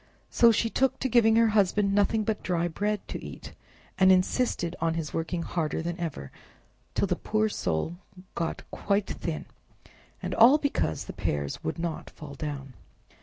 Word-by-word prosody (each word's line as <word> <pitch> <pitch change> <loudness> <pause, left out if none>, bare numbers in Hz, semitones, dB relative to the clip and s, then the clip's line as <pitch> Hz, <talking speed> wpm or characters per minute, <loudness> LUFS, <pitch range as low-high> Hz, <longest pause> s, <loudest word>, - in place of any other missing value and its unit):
So 235 -1 +6
she 230 +1 +1
took 265 +3 +1
to 265 - +1
giving 225 -2 +4
her 230 0 +5
husband 205 -1 +2
nothing 205 +2 +2
but 215 0 -2
dry 175 -1 0
bread 205 +4 -2
to - - -6
eat, - - -9 0.5
and 190 0 +7
insisted 185 -2 +1
on 165 0 +1
his 160 -2 -4
working 165 +1 -2
harder 160 -2 -2
than 170 +1 -4
ever, 145 - -5 0.6
till - - +2
the 180 -2 0
poor 215 +4 0
soul 160 - -2 0.4
got 165 -1 -3
quite 200 0 0
thin; - - -4 0.7
and - - -4
all 245 +6 +7
because 285 - -1
the - - -7
pears 70 -1 -3
would 80 - -3
not 165 -1 -4
fall 150 -2 -10
down! 140 -2 -6
185 Hz, 170 wpm, -27 LUFS, 165-215 Hz, 0.7 s, and